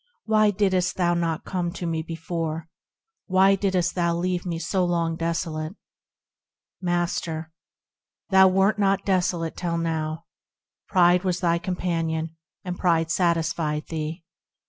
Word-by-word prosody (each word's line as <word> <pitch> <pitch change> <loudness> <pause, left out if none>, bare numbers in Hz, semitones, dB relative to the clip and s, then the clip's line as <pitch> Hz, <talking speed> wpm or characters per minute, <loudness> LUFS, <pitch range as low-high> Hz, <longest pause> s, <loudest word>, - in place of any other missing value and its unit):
Why 215 -1 +4
didst 185 -3 +1
thou 175 -2 +2
not 165 -2 -1
come 175 -2 -2
to 180 - -5
me 165 -1 -1
before? 165 0 -4 0.6
Why 190 0 +5
didst 190 -3 +1
thou 170 -2 +1
leave 180 +1 -1
me 170 -2 -2
so 185 +2 0
long 170 -2 0
desolate? 165 0 -3 1.1
Master. 170 -2 -2 0.8
Thou 190 0 +7
wert 195 +3 +3
not 195 -1 +2
desolate 180 -4 0
till 170 -2 -2
now; 160 -1 -2 0.6
Pride 180 -1 +4
was 185 -1 0
thy 170 -1 +2
companion, 165 -3 -2 0.3
and 180 -2 -5
pride 165 -3 +2
satisfied 165 -3 0
thee. 160 +1 -4
170 Hz, 125 wpm, -25 LUFS, 165-185 Hz, 1.1 s, Thou